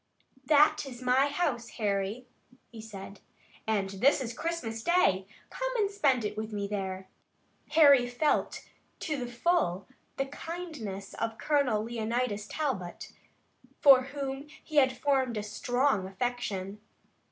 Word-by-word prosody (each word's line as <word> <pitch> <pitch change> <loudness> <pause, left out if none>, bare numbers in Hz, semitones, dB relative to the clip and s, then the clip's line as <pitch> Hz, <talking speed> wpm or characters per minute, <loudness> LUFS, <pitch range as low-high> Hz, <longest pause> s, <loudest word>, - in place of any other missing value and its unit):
"That 300 0 +4
is 245 -3 -9
my 255 +2 +4
house, 285 -6 -1
Harry," 205 +2 -1 0.5
he 225 -2 -9
said, 200 -2 -9 0.5
"and 205 -3 +1
this 200 +11 +3
is 240 -3 -4
Christmas 245 -7 -3
Day. 210 - +2 0.2
Come - - -2
and 410 -4 +1
spend 275 - +2
it 210 0 -3
with 215 +1 -4
me 200 -1 -3
there." 190 -2 -4 0.7
Harry 285 -6 +7
felt 270 +5 0 0.4
to 310 - -2
the 245 - -6
full 240 - +1 0.3
the 270 - 0
kindness 285 - -7
of 225 0 -3
Colonel 270 -9 +1
Leonidas 225 -2 -2
Talbot, 210 - -4 0.7
for 265 -3 +7
whom 275 0 -5 0.2
he 310 - -5
had 260 -2 +4
formed 265 -5 +1
a 210 - -2
strong 245 0 0
affection. 205 -2 -3
245 Hz, 130 wpm, -29 LUFS, 210-285 Hz, 0.7 s, Harry